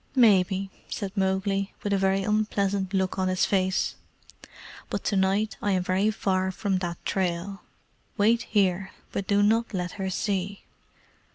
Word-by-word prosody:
"Maybe," 195 -5 +4 0.2
said 200 -1 -4
Mowgli, 195 0 0
with 205 - 0
a - - +3
very 195 0 +2
unpleasant 200 -2 0
look 190 -1 0
on 185 - +1
his 185 0 +2
face; 190 -1 +1 1.0
"but - - -3
to 205 - 0
night 195 +3 +1
I 205 - +1
am 185 -1 +1
very 190 +3 +2
far 190 -3 0
from 190 0 -1
that 175 -2 -3
trail. 190 +1 -2 0.6
Wait 225 +3 +4
here, 190 -3 +2 0.2
but 195 - -3
do 205 0 +3
not 225 +1 +2
let 180 -1 -2
her 190 - -1
see." 195 0 -2
195 Hz, 155 wpm, -26 LUFS, 190-205 Hz, 1.0 s, Maybe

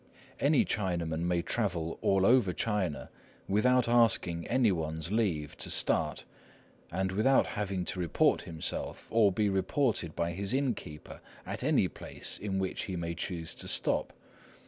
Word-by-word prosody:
Any 145 -1 +3
Chinaman 85 -6 -1
may 90 -1 0
travel 85 -8 -2
all 95 -1 +3
over 115 -6 +4
China 95 -3 -2 0.4
without 125 +5 +3
asking 110 -8 +3
any 120 -3 +3
one's 80 0 -3
leave 90 -10 0
to - - -4
start, - - +1 0.7
and 95 +2 -1
without 110 +8 +3
having 100 -3 -3
to 90 - -3
report 85 -3 +2
himself, 80 -2 -5
or 110 -3 +4
be 105 +3 +1
reported 95 - 0
by 85 0 -1
his 100 +7 0
innkeeper, 120 - -4 0.2
at - - -5
any - - +3
place - - -6
at 105 - -3
which 95 -1 -1
he 95 - -4
may 85 -1 -3
choose 85 -1 -4
to - - -8
stop. - - +1
95 Hz, 145 wpm, -30 LUFS, 85-110 Hz, 0.7 s, over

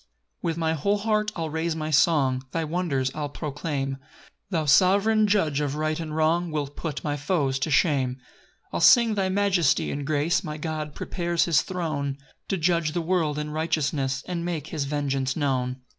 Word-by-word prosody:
1 170 - -2
With 165 - -2
my 160 -1 0
whole 200 +7 +1
heart 215 0 0
I'll 160 -3 -3
raise 160 +1 -1
my 155 -1 -3
song, 135 -4 +3
Thy 165 - 0
wonders 155 -5 -1
I'll 150 -1 -3
proclaim; 140 -2 -3 0.5
Thou 165 -5 0
sov'reign 200 +8 +4
judge 160 -9 +1
of 145 -1 -1
right 155 +1 -1
and 155 -2 -5
wrong 165 +2 +2
Wilt 145 -2 -3
put 160 -4 -4
my 145 -1 -1
foes 145 -3 0
to 135 - -1
shame. 140 -4 +2
2 130 - -25 0.5
I'll - - -1
sing 235 -3 +6
thy 195 -2 0
majesty 190 -6 +2
and 145 - -3
grace; 150 +3 +1
My 150 0 -5
God 155 -1 -4
prepares 170 -2 -1
his 160 -6 +3
throne 155 -7 -3 0.3
To 195 - -1
judge 170 -2 +1
the 175 - 0
world 165 -4 0
in 150 0 -3
righteousness 145 -4 -1
And 175 -2 -3
make 170 -4 -3
his 150 -3 -2
vengeance 135 -2 -1
known. 130 -3 -1
155 Hz, 185 wpm, -25 LUFS, 145-170 Hz, 0.5 s, sing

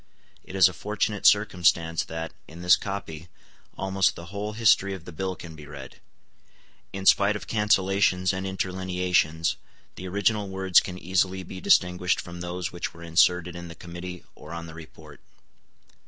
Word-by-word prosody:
It 95 - -10
is 95 -1 +7
a 90 - -4
fortunate 105 +4 0
circumstance 85 -5 +3
that, 80 0 -6
in 85 +2 -11
this 90 - +7
copy, 90 -5 -6 0.5
almost 95 0 +1
the 85 - -9
whole 105 +1 -4
history 100 -3 +3
of 90 -3 -12
the - - -8
Bill 95 +3 -3
can 80 -3 -10
be 75 -2 -12
read. 70 -3 -10 0.9
In 95 0 -6
spite 100 +2 +5
of 105 - -6
cancellations 95 -3 +2
and 95 +1 -3
interlineations, 90 -3 0 0.4
the 95 - -8
original 100 +2 0
words 95 -1 +4
can 90 -1 -6
easily 95 +1 0
be 95 0 -9
distinguished 90 0 +3
from 85 0 -8
those 90 0 -4
which 85 -1 -5
were 85 - -11
inserted 90 +1 +2
in 85 0 -7
the 85 - -10
committee 85 +2 -8
or 80 - -11
on 85 0 -6
the 80 - -10
report. 80 -2 -13
90 Hz, 165 wpm, -26 LUFS, 85-95 Hz, 0.9 s, is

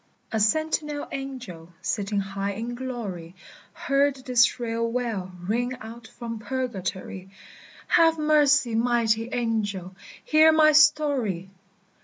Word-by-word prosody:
A 220 - 0
sentinel 300 +5 0
angel, 255 -12 -7
sitting 205 -1 -2
high 195 0 -3
in 230 +4 -5
glory, 215 -9 -6 0.4
Heard 275 0 +1
this 245 -3 +5
shrill 230 -1 -2
wail 225 -7 -3
ring 245 +6 -1
out 230 0 -10
from 230 -2 -7
Purgatory: 195 -6 -4 0.6
"Have 325 -1 +4
mercy, 295 -4 +3
mighty 230 -1 +1
angel, 205 -6 -2 0.3
hear 315 +1 +6
my 310 -1 +5
story! 285 - +2
235 Hz, 110 wpm, -25 LUFS, 205-275 Hz, 0.6 s, hear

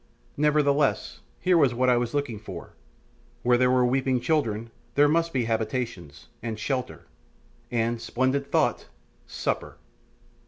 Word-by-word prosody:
Nevertheless, 150 -1 +2 0.2
here 180 -2 +3
was 135 -5 +3
what 130 +2 +2
I 125 - +5
was 120 +2 -1
looking 140 -7 -2
for; 105 - -9 0.7
where 125 0 +4
there 125 +1 +3
were 125 -1 +4
weeping 130 0 +1
children 115 -7 -1 0.2
there 145 +1 +6
must 165 +2 +2
be 130 -5 0
habitations, 110 - -3
and 115 -1 -4
shelter, 125 +3 -3 0.6
and 115 0 -1
splendid 130 +4 -1
thought! - - +1 0.4
supper. - - -3
125 Hz, 130 wpm, -26 LUFS, 115-140 Hz, 0.7 s, there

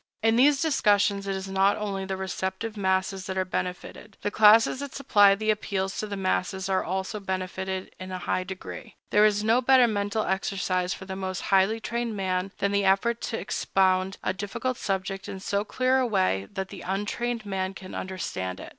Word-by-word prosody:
In 225 0 +4
these 275 +3 +5
discussions, 205 -9 +2
it 195 - -1
is 190 0 -5
not 195 +1 +2
only 200 -2 -3
the 190 0 -3
receptive 190 +3 -3
masses 190 -1 0
that 190 0 -4
are 185 - +1
benefited; 185 +3 -5
the 205 - -1
classes 220 +4 +6
that 285 -1 -6
supply 205 -8 +5
the 215 +2 +1
appeals 195 -2 -2
to 215 - -2
the 200 -1 -5
masses 190 0 -1
are 190 -1 +1
also 190 +4 -3
benefited 190 0 -4
in 185 0 -7
a 185 - -3
high 185 0 -1
degree. 190 0 -8 0.2
There 210 +1 +6
is 210 0 0
no 225 +3 +3
better 255 0 +6
mental 210 -1 -1
exercise 185 -1 -1
for 190 - -5
the 190 0 -5
most 190 -1 -4
highly 195 +4 +4
trained 235 -1 -3
man 185 0 -1
than 200 - 0
the 200 0 +2
effort 200 +5 +2
to 225 - -2
expound 190 0 +1
a 185 - 0
difficult 235 +6 -3
subject 195 -1 -3
in 190 - -6
so 200 +1 -1
clear 255 +4 +1
a 255 - +1
way 185 - +1
that 190 -1 -4
the 195 - -9
untrained 215 +5 -2
man 190 -1 -3
can 185 -1 -9
understand 95 - -4
it. - - -8
195 Hz, 195 wpm, -26 LUFS, 190-215 Hz, 0.2 s, classes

